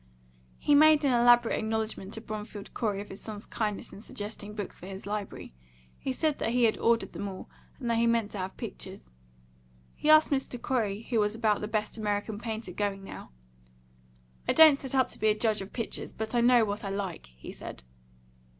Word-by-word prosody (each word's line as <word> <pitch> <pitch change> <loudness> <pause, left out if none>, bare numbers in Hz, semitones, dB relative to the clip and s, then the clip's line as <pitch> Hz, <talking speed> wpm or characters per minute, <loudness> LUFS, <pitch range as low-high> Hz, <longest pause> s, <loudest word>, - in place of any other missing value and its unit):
He 295 - +2
made 305 0 +7
an 265 - +4
elaborate 240 -1 +5
acknowledgment 220 -3 -2
to 220 - -6
Bromfield 210 -2 -7
Corey 205 -4 -1
of 205 - -10
his 195 - -9
son's 210 -1 -7
kindness 210 -3 -3
in 200 - -10
suggesting 210 -1 -7
books 205 -2 -5
for 180 - -9
his 195 0 -8
library; 205 - -5 0.5
he 265 - -2
said 300 +2 0
that - - 0
he 245 +1 +2
had 225 -2 +4
ordered 230 0 +2
them 200 - -4
all, 190 -1 -8 0.3
and 250 - -4
that 230 -1 +2
he 235 - +3
meant 230 -2 +1
to 205 - -5
have 185 +1 -5
pictures. 60 0 -8 0.8
He 300 - -2
asked 310 0 +7
Mr. 265 -3 -1
Corey 220 -5 -1
who 230 -1 0
was 210 0 +1
about 220 -2 +1
the 210 - -2
best 215 +1 -2
American 205 0 -2
painter 220 -4 -4
going 195 +1 -2
now. 195 - -9 1.2
"I - - +3
don't 310 -3 +8
set 270 -1 -4
up 260 -2 +4
to - - -10
be 215 - +2
a 215 0 +3
judge 215 -2 +1
of 195 - -8
pictures, 230 - -5
but 220 +1 -4
I 240 - +3
know 240 -1 +6
what 205 +1 -4
I 200 - -3
like," 195 - -4
he - - -8
said. - - -9
220 Hz, 205 wpm, -29 LUFS, 205-240 Hz, 1.2 s, don't